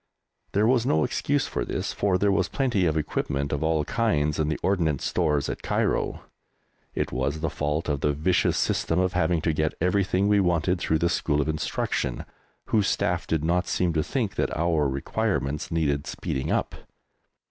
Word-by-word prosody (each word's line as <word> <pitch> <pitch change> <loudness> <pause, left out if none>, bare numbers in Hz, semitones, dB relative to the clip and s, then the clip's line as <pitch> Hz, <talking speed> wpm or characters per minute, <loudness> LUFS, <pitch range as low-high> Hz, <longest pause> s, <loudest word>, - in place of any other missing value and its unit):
There 105 +2 +3
was 120 0 +3
no 80 -10 +2
excuse - - 0
for - - -2
this, - - -3
for 100 -2 +1
there 100 +2 +2
was 95 -2 +2
plenty 120 -10 +1
of 80 0 0
equipment 70 -2 -2
of 75 - -1
all 80 -2 +1
kinds 75 -11 0
in 75 - +1
the 75 - -1
Ordnance 85 -8 +1
Stores 75 -5 +1
at - - -4
Cairo. - - 0 0.7
It - - -1
was 70 +5 -2
the 80 - -1
fault 75 +2 -2
of 70 -3 -1
the 75 - +2
vicious 80 +5 +1
system 80 - 0
of 90 0 +1
having 85 -2 +1
to 80 0 +1
get 75 0 0
everything 95 +2 +1
we 105 0 +4
wanted 90 -1 +1
through 80 -2 +1
the 85 - +1
School 75 -3 0
of 75 - 0
Instruction, 80 -1 -2 0.4
whose 105 -3 +2
staff - - 0
did 80 -2 0
not 90 +2 +1
seem 90 -2 0
to 80 - +1
think 110 - -2
that - - -1
our 80 -3 +1
requirements 75 +1 -2
needed 75 -3 0
speeding 65 0 -3
up. - - 0
80 Hz, 185 wpm, -26 LUFS, 75-95 Hz, 0.7 s, we